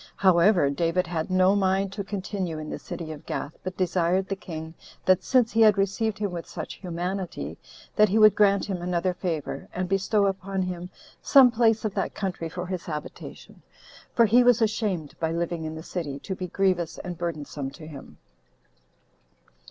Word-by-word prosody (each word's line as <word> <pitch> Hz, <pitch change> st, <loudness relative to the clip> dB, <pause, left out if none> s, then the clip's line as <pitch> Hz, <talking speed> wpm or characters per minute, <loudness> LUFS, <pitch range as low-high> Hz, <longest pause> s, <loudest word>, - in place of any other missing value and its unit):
However, 180 Hz, -4 st, +4 dB
David 165 Hz, +5 st, 0 dB
had 165 Hz, -1 st, -3 dB
no 185 Hz, +1 st, +4 dB
mind 195 Hz, 0 st, +1 dB
to 200 Hz, -, -4 dB
continue 190 Hz, -4 st, -4 dB
in 155 Hz, 0 st, -6 dB
the -, -, -5 dB
city 160 Hz, -2 st, -6 dB
of 155 Hz, 0 st, -9 dB
Gath, 145 Hz, -, -4 dB
but 185 Hz, 0 st, -5 dB
desired 185 Hz, +1 st, +1 dB
the 195 Hz, -, -2 dB
king, 160 Hz, -4 st, -7 dB, 0.3 s
that 185 Hz, -1 st, +4 dB
since 250 Hz, -3 st, +3 dB
he 225 Hz, -, +2 dB
had 215 Hz, -2 st, +6 dB
received 200 Hz, +2 st, 0 dB
him 205 Hz, -2 st, -2 dB
with 170 Hz, -1 st, -6 dB
such 175 Hz, -, -6 dB
humanity, 180 Hz, +1 st, -4 dB, 0.4 s
that 210 Hz, -1 st, +5 dB
he 205 Hz, -, +2 dB
would 215 Hz, -2 st, +7 dB
grant 200 Hz, -1 st, +3 dB
him 190 Hz, -4 st, -4 dB
another 180 Hz, +1 st, 0 dB
favor, 170 Hz, -5 st, -4 dB
and 185 Hz, 0 st, -3 dB
bestow 195 Hz, +2 st, +2 dB
upon 195 Hz, 0 st, -1 dB
him 180 Hz, -1 st, -5 dB, 0.3 s
some 265 Hz, -3 st, +7 dB
place 225 Hz, -1 st, +2 dB
of 210 Hz, -, -1 dB
that -, -, -2 dB
country 180 Hz, -4 st, -3 dB
for 180 Hz, +2 st, -5 dB
his 180 Hz, -1 st, -4 dB
habitation, 150 Hz, -2 st, -8 dB, 0.5 s
for 235 Hz, -, +6 dB
he 240 Hz, +4 st, +5 dB
was 245 Hz, -1 st, +5 dB
ashamed, 210 Hz, -8 st, -1 dB
by 160 Hz, -1 st, 0 dB
living 170 Hz, -1 st, -2 dB
in 155 Hz, 0 st, -5 dB
the 160 Hz, -, -8 dB
city, 160 Hz, -6 st, -4 dB
to 190 Hz, -, -4 dB
be 185 Hz, -1 st, -5 dB
grievous 180 Hz, -2 st, 0 dB
and 175 Hz, -2 st, -7 dB
burdensome 150 Hz, -5 st, -4 dB
to 145 Hz, +3 st, -12 dB
him. 150 Hz, -3 st, -11 dB
185 Hz, 185 wpm, -26 LUFS, 170-200 Hz, 0.5 s, would